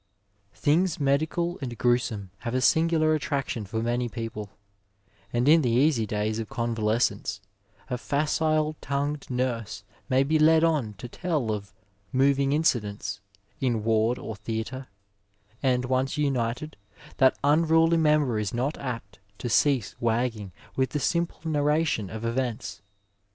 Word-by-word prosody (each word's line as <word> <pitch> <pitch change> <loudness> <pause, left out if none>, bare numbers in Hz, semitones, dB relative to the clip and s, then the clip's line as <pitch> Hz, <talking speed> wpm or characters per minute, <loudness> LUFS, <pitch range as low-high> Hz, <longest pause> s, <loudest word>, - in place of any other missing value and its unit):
Things 165 +4 +2
medical 160 +6 0
and 120 -3 -5
gruesome 120 -6 0
have 120 0 -4
a - - +3
singular 160 +2 +3
attraction 140 -7 -2
for 110 +3 -2
many 120 +1 0
people, 115 -3 -5 0.8
and 120 +2 +1
in 160 +2 +7
the 125 - +1
easy 120 -1 +3
days 105 +1 -1
of 110 - -5
convalescence 110 -3 0 0.5
a 125 - -3
facile 155 +2 +1
tongued 140 +1 -2
nurse 125 -3 -2 0.3
may 130 +1 +4
be 155 +3 +1
led 160 +1 +5
on 145 -11 +1
to 115 +6 -8
tell 150 -4 -2
of 100 -2 -4 0.2
*' 100 +1 -41
moving 135 +1 +3
incidents" 105 -9 0 0.4
in 120 -5 0
ward 115 +2 +2
or 110 - -6
theatre, 115 +5 -5 0.7
and 125 -2 +1
once 130 +3 0
untied, 135 0 -1 0.4
that 130 0 +4
unruly 165 +3 +4
member 150 -7 +3
is 105 +1 -2
not 135 +6 -1
apt 115 -8 -6 0.2
to 120 - -4
cease 130 -2 +2
wagging 115 -4 -1 0.2
with 130 0 +1
the 150 - 0
simple 170 +5 -1
narration 150 - +1
of 110 +3 -6
events. 115 -5 -3
130 Hz, 140 wpm, -26 LUFS, 115-150 Hz, 0.8 s, in